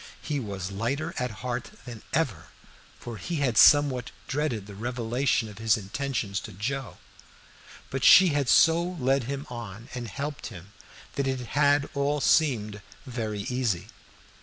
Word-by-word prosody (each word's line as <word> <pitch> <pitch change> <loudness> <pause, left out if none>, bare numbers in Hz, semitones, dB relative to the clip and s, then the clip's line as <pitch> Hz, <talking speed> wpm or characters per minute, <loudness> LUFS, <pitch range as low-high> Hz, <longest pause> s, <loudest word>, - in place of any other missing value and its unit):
He 145 -2 -3
was 100 -5 -5
lighter 140 - -2
at 125 0 -1 0.2
heart 125 0 -3
than 120 -4 -8
ever, 130 - -1 0.5
for 120 -2 -7
he 175 - -4
had 135 -6 0
somewhat 140 -3 +6 0.2
dreaded 135 -8 -1
the 100 - -10
revelation 120 +2 -1
of 105 0 -11
his 110 +1 +3
intentions 110 -1 -3
to - - -9
Joe; 130 +6 -4 0.9
but 135 -1 -3
she 185 +4 +8
had 145 -4 0
so 165 +8 +6
led 135 -8 0
him 140 +2 -4
on 115 -1 -8
and 120 -2 -5
helped 140 +7 -5
him 100 -1 -11 0.4
that 140 -1 0
it 130 -1 -1
had 145 0 +3
all 145 +1 0
seemed 110 -10 +2 0.2
very 110 -5 -4
easy. 115 -6 -2
125 Hz, 150 wpm, -27 LUFS, 110-140 Hz, 0.9 s, she